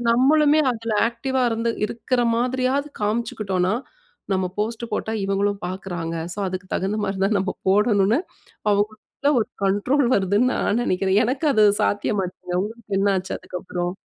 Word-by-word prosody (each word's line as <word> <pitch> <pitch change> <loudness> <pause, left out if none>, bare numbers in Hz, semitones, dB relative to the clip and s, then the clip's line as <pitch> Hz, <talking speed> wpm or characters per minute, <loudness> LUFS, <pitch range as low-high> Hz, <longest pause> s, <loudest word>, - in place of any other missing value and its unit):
நம்மளுமே 295 +5 +4
அதுல 230 -1 -3
ஆக்டிவ்வா 255 +2 -2
இருந்து, 230 +1 0
இருக்கிற 240 +3 -1
மாதிரியாவது 255 +4 0
காமிச்சுக்கிட்டோம்னா, 210 -3 0 0.6
நம்ம 185 -1 0
போஸ்ட் 225 +2 -2
போட்டா 220 - -2
இவங்களும் 200 +1 0
பார்க்கிறாங்க. 175 -3 -4 0.2
சோ - - -11
அதுக்கு 185 0 -5
தகுந்த 195 +3 -1
மாரி 195 -1 -2
தான் 205 +1 +2
நம்ம 190 0 -1 0.2
போடணும்னு 205 +2 +3 0.5
அவங்களுக்குள்ள 215 +7 -1
ஒரு 215 - 0 0.2
கண்ட்ரோல் 240 +8 +2
வருதுன்னு 205 +6 +2
நான் 230 +4 +1
நெனைக்கிறேன். 190 0 +2
எனக்கு 265 +6 -1
அது 215 - +5 0.2
சாத்தியமாச்சுங்க. 195 -3 -1
உங்களுக்கு 210 -1 -5
என்ன 200 0 +3
ஆச்சு 185 - -6
அதுக்கப்புறம்? 180 -1 -4
210 Hz, 135 wpm, -23 LUFS, 195-235 Hz, 0.6 s, அது